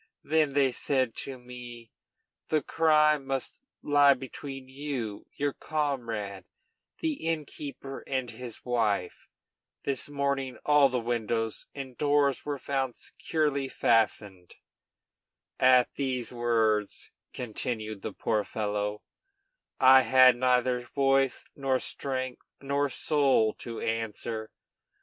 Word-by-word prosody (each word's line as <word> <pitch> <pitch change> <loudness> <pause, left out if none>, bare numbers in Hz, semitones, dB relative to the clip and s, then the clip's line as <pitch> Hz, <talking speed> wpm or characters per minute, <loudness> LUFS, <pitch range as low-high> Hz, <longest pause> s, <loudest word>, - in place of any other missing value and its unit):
Then 155 -2 +2
they 135 -2 +3
said 130 -1 0
to 135 -1 -6
me: 120 -2 -10 0.6
'The 155 -3 +1
crime 150 -2 +3
must 135 -1 -4 0.2
lie 145 -1 +5
between 135 +1 -8
you, 130 -6 -5
your 145 -1 -1
comrade, 115 -10 -3 0.6
the 315 - -2
innkeeper, 145 -3 -4
and 130 -3 -2
his 120 0 -9
wife. 110 -7 -1 0.6
This 140 0 -1
morning 140 -2 -1
all 145 -2 +6
the 125 -1 0
windows 115 -1 -2
and 135 -3 -7
doors 145 -2 +2
were 145 -1 -3
found 135 -2 -2
securely 145 -4 -2
fastened.' 105 -7 0 1.0
At 130 -1 +5
those 130 -3 -2
words," 115 -3 0 0.2
continued 110 -3 -4
the - - -4
poor 110 -2 0
fellow, 105 -1 -3 0.8
"I 130 0 +8
had 130 -1 +6
neither 125 0 +2
voice, 135 -1 +1
nor 135 -2 +1
strength, 130 -2 -4 0.2
nor 140 +1 0
soul 135 -5 +2
to 115 -2 -6
answer. 115 0 -3
130 Hz, 110 wpm, -28 LUFS, 115-140 Hz, 1.0 s, I